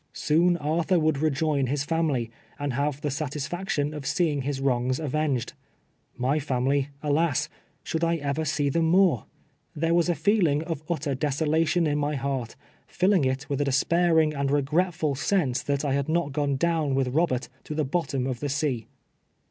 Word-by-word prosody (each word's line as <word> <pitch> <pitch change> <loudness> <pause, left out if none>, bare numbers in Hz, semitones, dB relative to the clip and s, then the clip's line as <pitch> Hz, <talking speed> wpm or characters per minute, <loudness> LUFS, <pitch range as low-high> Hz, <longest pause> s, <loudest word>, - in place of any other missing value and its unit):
Soon 170 +3 +2
Arthur 165 +4 +1
would 155 -3 +1
rejoin 150 -2 +1
his 140 +2 -1
family, 145 -8 0 0.3
and 145 -2 -2
haye 140 +3 +1
the 145 - 0
satisfaction 150 +2 -2
of 145 -2 -6
seeing 155 -6 +1
his 135 0 -3
wrongs 130 -1 0
avenged: 150 -4 -1 0.6
my 135 +5 +1
family, 135 0 0
alas, 150 0 +1 0.3
should 160 +1 -2
I 170 0 +2
ever 145 0 -2
see 145 -1 0
them 165 +3 +1
more? 170 - +3 0.5
There 165 +2 +1
was 170 0 +3
a 175 - +2
feeling 170 -9 +2
of 165 -3 -4
utter 155 -4 -1
deso 145 +3 -1
lation 165 +2 +2
in 145 0 0
my 145 +1 -1
heart, 135 -3 -3 0.3
filling 185 -5 +2
it 130 +2 -1
with 140 0 -1
a - - +1
despairing 160 +3 +3
and 140 -1 -1
re 145 0 +2
gretful 160 0 0
sense, 145 -2 0
that 140 0 -1
I 140 - +1
had 140 +1 -1
not 160 -3 0
gone 145 -1 0
down 155 -2 +1
with 135 -1 +1
Robert 140 -2 0 0.2
to 155 - -5
the 155 -1 0
bottom 140 -3 -1
of 130 -2 -3
the 145 - -3
sea. 135 -5 -1
150 Hz, 180 wpm, -26 LUFS, 140-165 Hz, 0.6 s, more